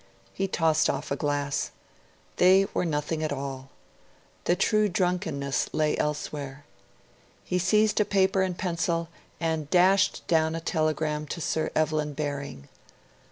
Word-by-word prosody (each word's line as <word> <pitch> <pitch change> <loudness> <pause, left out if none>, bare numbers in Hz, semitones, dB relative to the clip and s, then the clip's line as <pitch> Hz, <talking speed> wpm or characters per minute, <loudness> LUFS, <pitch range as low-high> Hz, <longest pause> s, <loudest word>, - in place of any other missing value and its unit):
He 195 - -1
tossed 160 -4 +2
off - - -3
a - - +2
glass. 145 -1 -1 0.7
They 190 +2 +6
were - - 0
nothing 155 0 -1
at 155 - -1
all. 135 -1 -5 0.8
The 175 - +3
true 215 +3 +2
drunkenness 175 -7 -1
lay 155 -1 +1
elsewhere. 145 -2 -3 0.8
He 180 - 0
seized 210 +4 +3
a - - +5
paper 195 0 +2
and 185 -2 -1
pencil, 170 -2 -1 0.3
and 160 -3 -1
dashed 185 +2 +3
down 160 -1 +2
a - - -2
telegram 155 -2 -1
to 170 - -5
Sir 160 -1 -1
Evelyn 155 -1 0
Baring. 140 - -5
160 Hz, 135 wpm, -27 LUFS, 145-180 Hz, 0.8 s, They